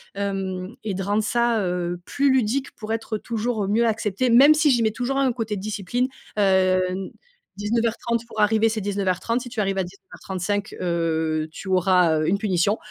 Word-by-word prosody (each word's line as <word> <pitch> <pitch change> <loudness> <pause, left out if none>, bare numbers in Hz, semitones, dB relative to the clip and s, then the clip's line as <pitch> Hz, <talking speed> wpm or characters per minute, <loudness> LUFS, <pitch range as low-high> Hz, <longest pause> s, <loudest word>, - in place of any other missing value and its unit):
hem 195 0 -3
et 210 -3 -2
de 195 - -3
rendre 205 +2 0
ça, 235 0 +1
heu, 175 0 -2
plus 280 0 +1
ludique. 260 +2 +1
Pour 215 0 -7
être 225 -1 -3
toujours 225 -2 -2
mieux 230 +3 +3
accepté, 220 +2 0
même 275 +6 +8
si 305 0 +3
j'y 240 -2 +2
mets 220 - +2
toujours 250 +4 -2
un 270 -2 +2
côté 225 -3 -3
discipline. 215 +5 -2 0.3
Heu, 190 -2 +3
n 185 +1 -4 0.5
19:30 230 +2 -1
pour 220 - -8
arriver, 220 +1 +3
c'est 220 0 -2
19:30. 200 +4 -1
Si 245 - -8
tu 235 -2 -6
arrives 195 -1 0
à - - +1
19:35, 195 +2 -5
heu, 160 -2 0
tu 190 - -9
auras, 180 -3 +3
heu, 155 - 0
une 200 - +2
punition. 200 0 +1
210 Hz, 180 wpm, -23 LUFS, 185-230 Hz, 0.5 s, même